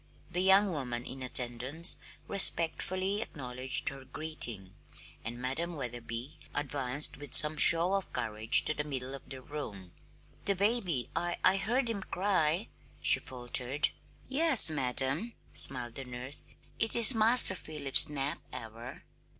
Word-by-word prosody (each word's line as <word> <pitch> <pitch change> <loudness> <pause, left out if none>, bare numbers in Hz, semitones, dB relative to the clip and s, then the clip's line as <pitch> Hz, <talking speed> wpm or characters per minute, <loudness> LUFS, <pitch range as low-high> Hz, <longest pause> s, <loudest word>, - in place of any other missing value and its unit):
The 180 +1 -3
young 195 +1 +2
woman 125 -6 -6
in 130 0 -10
attendance 130 +6 -3 0.3
respectfully 185 +1 +1
acknowledged 130 - -2
her 135 -1 -12
greeting, 120 -11 -5 0.5
and 120 +2 -8
Madam 155 +7 -5
Wetherby 120 0 -8 0.2
advanced 145 -1 -2
with 145 -2 -1
some 150 0 +7
show 170 +4 +6
of 195 -1 -5
courage 110 0 +2
to - - -1
the 150 - -6
middle 135 -3 -7
of 135 -1 -12
the 130 -1 -11
room. 105 -12 -10 0.5
"The 200 - 0
baby, 195 - -1
I 175 +1 -4
I 190 - +2
heard 240 +6 -3
him 225 -4 -5
cry," 185 -1 -3 0.3
she - - +9
faltered. 125 +3 -1 0.4
"Yes, 275 - +4
madam," 140 - -3 0.2
smiled 125 -3 +6
the 135 - -10
nurse. 125 +3 -5 0.3
"It 225 - -3
is 235 +2 +7
Master 225 -2 +4
Philip's 150 -7 +2
nap 140 -1 -5
hour." 115 0 -11
145 Hz, 135 wpm, -28 LUFS, 125-185 Hz, 0.5 s, she